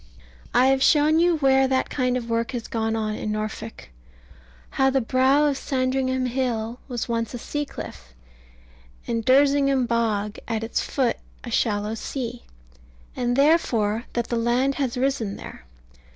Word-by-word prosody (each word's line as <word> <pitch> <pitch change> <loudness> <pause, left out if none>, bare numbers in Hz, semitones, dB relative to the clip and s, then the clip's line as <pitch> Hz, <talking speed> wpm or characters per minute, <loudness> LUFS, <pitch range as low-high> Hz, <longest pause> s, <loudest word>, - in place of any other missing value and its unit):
I 245 +2 +4
have 265 0 +3
shown 305 +2 +4
you 345 -1 +3
where 270 -2 +4
that 260 0 0
kind 250 -2 0
of 235 -2 -5
work 230 +1 -1
has 235 -2 -4
gone 225 -1 -1
on 215 -1 -1
in 215 - -3
Norfolk; 215 - -5 0.8
how 265 0 +3
the 270 0 +2
brow 260 +4 +3
of 285 -2 0
Sandringham 260 -1 0
Hill 240 -2 -2
was 245 -4 -3
once 230 0 -2
a - - -3
sea 295 +5 -3
cliff, - - -9 0.9
and 230 -1 -2
Dersingham 275 0 +4
Bog 220 -3 -1
at 225 -1 -2
its 225 - -1
foot 260 -4 0 0.3
a 240 - -7
shallow 210 -2 0
sea; 240 +1 -5 0.7
and 245 -1 0
therefore 245 -7 +2
that 235 -1 -2
the 235 - 0
land 245 +4 +1
has 255 -3 -1
risen 250 -6 -1
there. - - -10
245 Hz, 155 wpm, -24 LUFS, 225-270 Hz, 0.9 s, I